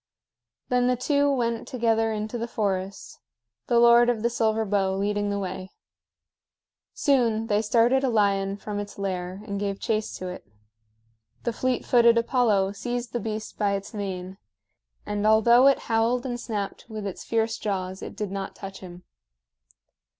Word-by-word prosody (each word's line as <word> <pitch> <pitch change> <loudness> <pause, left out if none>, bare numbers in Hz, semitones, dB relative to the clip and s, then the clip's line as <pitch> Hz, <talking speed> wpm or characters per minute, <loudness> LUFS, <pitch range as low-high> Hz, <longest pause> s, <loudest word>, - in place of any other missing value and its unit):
Then 250 0 +2
the 250 - +3
two 285 +3 +2
went 235 -4 -1
together 225 -2 +1
into 215 +2 -3
the 230 - -3
forest, 195 -3 -3 0.5
the 240 - +3
Lord 235 0 +6
of 230 -3 -1
the 235 - +1
Silver 220 -1 +1
Bow 195 -2 +1
leading 205 +1 -1
the 200 - -1
way. 190 -1 -5 1.3
Soon 235 -6 +2
they 210 -2 +1
started 235 +4 +3
a 265 - +2
lion 200 -3 +1
from 205 0 -5
its 205 0 -7
lair 185 0 -4
and 200 -2 -4
gave 200 -1 -2
chase 215 -1 -2
to 185 - -6
it. 180 - -7 1.0
The 235 - -1
fleet 255 +1 -1
footed 235 -1 +5
Apollo 230 -5 +2
seized 240 +4 -4
the 240 - 0
beast 215 0 -5
by 205 -1 +2
its 200 +2 -4
mane, 190 -2 -5 0.7
and 210 0 -1
although 235 +4 +6
it 275 - +4
howled 230 +2 +1
and 245 -2 -3
snapped 210 -1 -5
with 215 -2 -6
its 195 - -5
fierce 225 0 -1
jaws 190 -2 -3
it - - -7
did 210 -3 -4
not 195 0 -5
touch 195 -1 -8
him. 180 -1 -11
215 Hz, 165 wpm, -25 LUFS, 200-235 Hz, 1.3 s, Lord